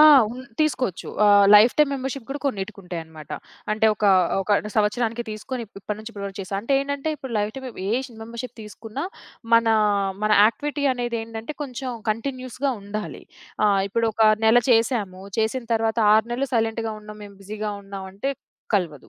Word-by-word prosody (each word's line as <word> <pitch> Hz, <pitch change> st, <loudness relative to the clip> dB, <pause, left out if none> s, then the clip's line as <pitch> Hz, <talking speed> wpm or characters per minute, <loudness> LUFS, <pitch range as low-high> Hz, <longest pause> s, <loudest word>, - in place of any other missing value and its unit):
ఆ! -, -, +10 dB, 0.3 s
ఉన్ 250 Hz, +2 st, -7 dB, 0.2 s
తీసుకోవచ్చు. 265 Hz, -, 0 dB, 0.2 s
ఆహ్, 205 Hz, -1 st, +7 dB
లైఫ్ 215 Hz, +4 st, +8 dB
టైమ్ 300 Hz, -2 st, +5 dB
మెంబర్‌షిప్ 265 Hz, -2 st, -4 dB
కూడా 285 Hz, +1 st, -4 dB
కొన్నిటికుంటాయనమాట. 180 Hz, -, -6 dB, 0.4 s
అంటే 220 Hz, +1 st, +2 dB
ఒకా, 210 Hz, -1 st, +3 dB, 0.3 s
ఒక 195 Hz, -, -6 dB
అంటే 210 Hz, -, -6 dB
సంవత్సరానికి 225 Hz, +2 st, +1 dB
తీసుకొని 235 Hz, +3 st, -5 dB
ఇప్ 205 Hz, -, -27 dB
ఇప్పటి 210 Hz, +1 st, -4 dB
నుంచి 220 Hz, +1 st, -8 dB
ఇప్పటి 200 Hz, -1 st, -6 dB
వరకు 195 Hz, +1 st, -8 dB
చేశాం.అంటే 195 Hz, +6 st, -3 dB
ఏంటంటే 280 Hz, +2 st, -3 dB
ఇప్పుడు 265 Hz, -3 st, -8 dB
లైఫ్ 210 Hz, +1 st, -1 dB
టైమ్ 265 Hz, -1 st, -6 dB, 0.2 s
ఏ 235 Hz, +5 st, +1 dB, 0.2 s
మెంబర్‌షిప్ 235 Hz, +2 st, -7 dB
తీసుకున్నా, 220 Hz, -, -7 dB, 0.5 s
మన, 230 Hz, 0 st, +5 dB, 0.6 s
మన 215 Hz, -, +2 dB
యాక్టివిటీ 290 Hz, +6 st, 0 dB
అనేదేంటంటే 230 Hz, +1 st, -4 dB
కొంచెం 260 Hz, -1 st, -5 dB, 0.2 s
కంటిన్యూయస్‌గా 255 Hz, +3 st, -2 dB
ఉండాలి. 210 Hz, +1 st, -6 dB, 0.4 s
ఆహ్, 200 Hz, -2 st, +3 dB
ఇప్పుడు 230 Hz, +3 st, +1 dB
ఒక 225 Hz, -, +1 dB, 0.2 s
నెల 225 Hz, +2 st, +7 dB
చేసాము 225 Hz, -5 st, +1 dB, 0.2 s
చేసిన 225 Hz, +3 st, 0 dB
తరువాత 225 Hz, +1 st, 0 dB, 0.2 s
6 220 Hz, +1 st, +3 dB
నెలలు 265 Hz, +3 st, -1 dB
సైలెంట్‌గా 225 Hz, 0 st, 0 dB
ఉన్నాం, 210 Hz, 0 st, -11 dB
మేము 200 Hz, -1 st, -13 dB
బిజిగా 210 Hz, +1 st, -4 dB
ఉన్నాం 195 Hz, -1 st, -7 dB
అంటే 205 Hz, +8 st, -2 dB, 0.4 s
కలవదు. 165 Hz, -8 st, -1 dB
225 Hz, 160 wpm, -23 LUFS, 205-250 Hz, 0.6 s, ఆ